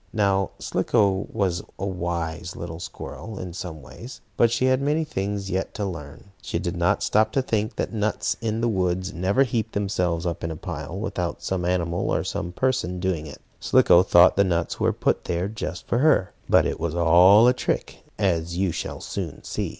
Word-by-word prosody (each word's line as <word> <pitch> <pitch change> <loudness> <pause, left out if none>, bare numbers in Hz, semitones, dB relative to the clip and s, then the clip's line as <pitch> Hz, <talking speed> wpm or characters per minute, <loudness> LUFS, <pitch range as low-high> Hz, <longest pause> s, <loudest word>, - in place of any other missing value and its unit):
Now 100 -3 +2
Slicko 100 -4 +1
was 95 -5 0 0.2
a 95 - -3
wise 85 -1 -3
little 85 -1 -6
squirrel 110 +4 -8
in 90 -2 -6
some 80 -4 -7
ways. 120 - -10 0.2
But 120 - +4
she 120 +3 +1
had 130 +1 +3
many 150 +3 +1
things 100 -8 -3
yet 95 +1 -2
to 105 - -2
learn. 85 +1 -8
She - - -3
did 85 0 -3
not 85 0 +1
stop 110 +1 +2
to 135 - +2
think 110 -2 -1
that - - -3
nuts 110 0 0
in 110 0 -1
the 120 - +2
woods 95 -2 -1
never 95 +9 +2
heap 115 -4 -2
themselves 90 -4 -1
up 85 -2 -3
in 85 - -1
a 80 - -4
pile 80 -1 -6
without 95 -5 -3
some 90 -2 -2
animal 85 -1 0
or - - +1
some 85 - -4
person 125 -5 -1
doing 90 -4 -2
it. 75 - -11 0.2
Slicko 85 - +5
thought 90 -1 +6
the 100 - +6
nuts 85 -3 -1
were - - +2
put - - 0
there 90 +2 -1
just 100 -5 -5
for 120 - +1
her. 145 -10 +3 0.2
But - - +5
it - - -2
was 85 0 -2
all 90 +7 +6
a 125 - +5
trick, - - -3
as 85 -4 0
you 95 -1 +1
shall - - -5
soon - - -5
see. - - -3
95 Hz, 195 wpm, -24 LUFS, 85-110 Hz, 0.2 s, thought